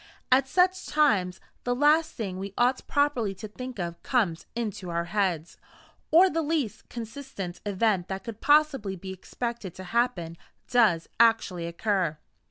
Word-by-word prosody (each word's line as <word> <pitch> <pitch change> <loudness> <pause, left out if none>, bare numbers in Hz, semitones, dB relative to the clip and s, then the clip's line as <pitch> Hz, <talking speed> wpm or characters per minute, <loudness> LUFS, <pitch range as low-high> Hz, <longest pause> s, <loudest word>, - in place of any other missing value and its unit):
At 265 +1 +5
such 370 +4 +2
times, 200 -12 +2 0.2
the 245 0 0
last 305 +4 +3
thing 190 -6 -4
we 195 0 -6
ought 250 +2 +2
properly 270 -9 +1
to 215 - -7
think 255 +4 -8
of 170 -2 -4
comes 205 -11 0
into 210 -6 -4
our 170 0 -1
heads, 175 -4 -1 0.5
or 350 +4 +7
the 330 -3 0
least 290 -9 -2
consistent 230 -6 -7
event 200 -2 +1
that 190 0 -5
could 225 -2 -8
possibly 290 -10 +3
be 190 +1 -7
expected 220 0 -5
to 185 - -8
happen 190 -9 0 0.3
does 215 -10 +3
actually 225 -7 +3
occur. 175 -2 0
220 Hz, 150 wpm, -27 LUFS, 185-260 Hz, 0.5 s, or